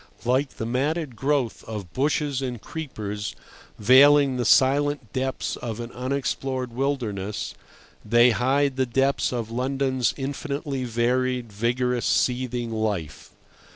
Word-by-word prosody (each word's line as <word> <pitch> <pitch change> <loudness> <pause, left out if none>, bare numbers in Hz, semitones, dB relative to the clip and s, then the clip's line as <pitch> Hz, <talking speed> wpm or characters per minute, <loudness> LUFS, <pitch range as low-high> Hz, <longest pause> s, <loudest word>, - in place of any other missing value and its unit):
Like 130 +3 +1
the 110 - -3
matted 140 +3 -1
growth 135 -2 0
of 100 -6 -7
bushes 145 - 0
and 125 -3 -3
creepers 105 -9 -5 0.4
veiling 135 +4 +6
the 125 -1 -1
silent 140 0 +3
depths 130 0 -2
of 115 -2 -5
an 120 0 -6
unexplored 130 -1 -2
wilderness, 115 -7 -2 0.5
they 120 +3 +5
hide 135 +3 +1
the 130 -1 +1
depths 135 +3 +1
of 115 -3 -3
London's 130 0 0
infinitely 140 0 -3
varied, 125 0 0
vigorous, 120 +3 0
seething 125 -2 0
life. 105 -8 -3
125 Hz, 120 wpm, -25 LUFS, 115-135 Hz, 0.5 s, veiling